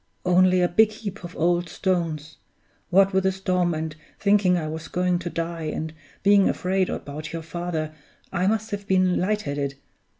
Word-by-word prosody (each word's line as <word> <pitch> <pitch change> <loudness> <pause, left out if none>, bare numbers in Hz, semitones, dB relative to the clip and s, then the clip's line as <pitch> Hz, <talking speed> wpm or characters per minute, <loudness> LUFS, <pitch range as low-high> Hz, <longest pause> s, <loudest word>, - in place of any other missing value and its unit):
Only 185 0 +4
a - - +4
big 215 +5 +4
heap 210 -2 -7
of 175 0 -8
old 175 +1 +1
stones! 165 -5 -2 0.5
What 195 +2 +4
with 190 0 +2
the 190 - +3
storm, 180 -3 0
and 155 0 -4 0.2
thinking 200 -3 +4
I 160 -2 -2
was 160 +1 -5
going 180 -1 0
to 175 -1 -4
die, 165 -1 -3
and 155 +1 -3 0.3
being 200 0 +5
afraid 185 0 0
about 150 +2 -5
your 165 -1 -5
father, 165 -2 -3 0.4
I 180 +2 +1
must 220 +1 0
have 200 -1 -4
been 185 -1 +3
light 210 +3 +1
headed. 140 -1 -2
180 Hz, 175 wpm, -24 LUFS, 160-190 Hz, 0.5 s, being